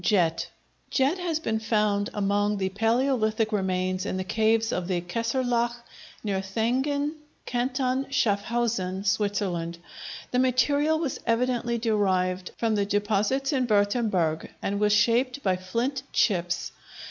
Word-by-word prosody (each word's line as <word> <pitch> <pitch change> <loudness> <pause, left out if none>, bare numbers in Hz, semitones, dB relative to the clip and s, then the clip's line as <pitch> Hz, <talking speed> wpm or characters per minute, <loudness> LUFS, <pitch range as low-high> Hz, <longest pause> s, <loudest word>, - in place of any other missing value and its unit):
Jet 175 -6 +2 0.4
Jet 280 +7 +1
has 340 -3 -1
been 220 -8 -1
found 210 -2 +1
among 205 0 +1
the 190 -1 -1
palæolithic 225 0 +1
remains 185 -2 0
in - - -2
the 185 - -2
caves 220 +3 +1
of 180 -5 -2
the 185 -2 0
"Kesslerloch," 235 +5 0 0.5
near 200 -3 -1
Thayngen, 260 +9 0 0.3
Canton 255 +2 -1
Schaffhausen, 205 -4 0
Switzerland. 195 -4 -1 0.5
The 250 - +2
material 285 +5 +3
was 315 -4 -2
evidently 235 0 +1
derived 190 -5 0
from 225 -2 +1
the 205 -1 +1
deposits 210 +8 +1
in 255 -2 +1
Würtemberg 205 -6 +1
and 200 +1 -2
was 210 0 +3
shaped 240 +6 +2
by 190 -2 +2
flint 230 +9 -2
chips. 175 -4 +1
220 Hz, 125 wpm, -26 LUFS, 195-250 Hz, 0.5 s, material